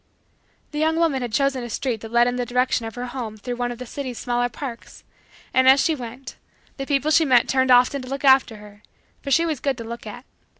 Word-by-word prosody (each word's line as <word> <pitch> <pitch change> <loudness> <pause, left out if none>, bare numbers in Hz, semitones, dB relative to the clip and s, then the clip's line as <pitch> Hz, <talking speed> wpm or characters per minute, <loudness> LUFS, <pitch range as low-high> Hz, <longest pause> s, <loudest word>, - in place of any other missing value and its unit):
The 300 - -4
young 320 +1 +2
woman 325 -5 +1
had 240 -2 -4
chosen 270 +1 0
a 240 - -6
street 230 -1 -3
that 225 - -9
led 235 0 +4
in 245 - -1
the 250 - -1
direction 250 -1 0
of 225 - -9
her 245 0 -4
home 240 -4 -6
through 245 +3 -5
one 245 0 -2
of 240 - -7
the 250 - -7
city's 255 -1 -6
smaller 245 0 -1
parks, 240 0 -9 0.5
and, 260 0 +5
as 270 +1 +7
she 320 - +2
went, 250 -1 -8 0.4
the 270 -1 -5
people 290 +1 +1
she 320 +1 +5
met 255 -5 +4
turned 260 0 +1
often 250 +2 +4
to 255 - -9
look 275 +1 -4
after 265 -4 +5
her 210 -1 -14 0.4
for 280 - -6
she 330 +5 +3
was 315 -5 -2
good 275 -3 -1
to 230 - -6
look 235 0 -8
at. 245 +5 -9
250 Hz, 245 wpm, -22 LUFS, 240-275 Hz, 0.5 s, as